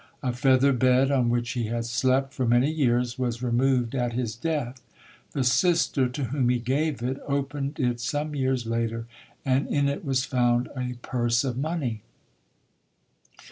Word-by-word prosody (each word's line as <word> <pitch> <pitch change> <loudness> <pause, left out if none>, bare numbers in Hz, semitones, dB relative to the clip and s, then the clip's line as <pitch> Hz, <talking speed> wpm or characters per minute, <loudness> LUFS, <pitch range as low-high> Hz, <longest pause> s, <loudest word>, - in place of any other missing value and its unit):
A 125 -2 0
feather 130 +2 +4
bed 130 +2 +3
on 125 -4 +2
which 120 0 0
he 120 -3 -2
had 115 +1 -2
slept 130 +3 +1
for 130 -2 -1
many 120 +5 +3
years 125 -4 0
was 120 -1 -2
removed 125 0 +1
at 120 -3 -1
his 115 -3 -2
death. 130 -2 -3 0.5
The 135 - 0
sister 140 -1 +2
to 135 +3 -4
whom 130 0 0
he 125 - +3
gave 135 +2 -1
it 130 +2 -2
opened 140 +1 -2
it 125 -3 0
some 145 +5 -2
years 130 -3 0
later 115 0 -2 0.4
and 135 +1 +1
in 140 -1 +1
it 140 +7 -2
was 135 -3 0
found 120 -1 +1
a 125 -1 -3
purse 120 -1 +1
of 130 -3 -2
money. 135 -6 -2
130 Hz, 165 wpm, -26 LUFS, 120-140 Hz, 0.5 s, feather